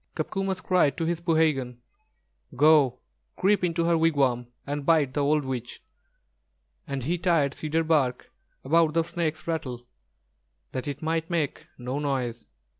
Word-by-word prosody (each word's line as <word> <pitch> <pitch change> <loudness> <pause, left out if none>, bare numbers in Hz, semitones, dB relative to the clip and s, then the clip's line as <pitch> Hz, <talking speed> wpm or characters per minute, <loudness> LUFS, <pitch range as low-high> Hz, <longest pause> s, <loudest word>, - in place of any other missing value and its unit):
Copcomus 195 -1 -2
cried 180 -8 +2
to 165 - -1
his 170 0 -1
poohegan: 155 -7 +1 0.8
"Go, 140 -3 +4 0.4
creep 200 +1 +2
into 170 -1 +1
her 170 0 +3
wigwam 140 -7 +2 0.2
and 145 0 -3
bite 150 -4 +3
the 145 - -1
old 145 0 +2
witch;" 125 -2 -5 1.0
and 135 -2 -3
he 170 +6 -1
tied 160 -6 +2
cedar 160 +1 -1
bark 145 -6 0 0.3
about 160 +2 +3
the 165 - +3
snake's 160 -2 -3
rattle, 130 -7 -4 0.9
that 130 +2 -4
it 145 +1 -5
might 160 0 -1
make 165 -5 -2
no 125 +3 -4
noise. 130 -5 -2
155 Hz, 140 wpm, -26 LUFS, 135-165 Hz, 1.0 s, Go